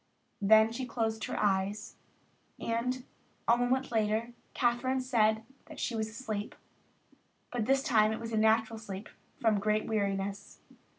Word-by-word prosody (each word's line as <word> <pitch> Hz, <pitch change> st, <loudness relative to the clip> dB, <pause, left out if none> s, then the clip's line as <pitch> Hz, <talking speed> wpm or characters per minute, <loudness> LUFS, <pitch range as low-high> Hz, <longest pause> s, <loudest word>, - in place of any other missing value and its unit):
Then 220 Hz, +2 st, +6 dB
she 250 Hz, +2 st, -4 dB
closed 225 Hz, -2 st, -1 dB
her -, -, -4 dB
eyes, 200 Hz, +1 st, 0 dB, 0.6 s
and 250 Hz, +3 st, -2 dB, 0.4 s
a 235 Hz, -, +6 dB
moment 245 Hz, +2 st, 0 dB
later 220 Hz, +1 st, 0 dB, 0.2 s
Kathryn 255 Hz, +2 st, +1 dB
said 220 Hz, -4 st, +2 dB, 0.2 s
that 310 Hz, -3 st, -10 dB
she 240 Hz, -, -1 dB
was 220 Hz, 0 st, -1 dB
asleep, 215 Hz, -3 st, -5 dB, 1.0 s
but 245 Hz, -, -3 dB
that 215 Hz, -, -1 dB
this 270 Hz, 0 st, +3 dB
time 220 Hz, -7 st, +4 dB
it 220 Hz, -, -3 dB
was 230 Hz, 0 st, -6 dB
a -, -, +1 dB
natural 220 Hz, +1 st, +3 dB
sleep 200 Hz, -1 st, -7 dB, 0.3 s
from 220 Hz, -3 st, +3 dB
great 215 Hz, +1 st, +1 dB
weariness. 200 Hz, -2 st, -2 dB
220 Hz, 145 wpm, -31 LUFS, 215-240 Hz, 1.0 s, Then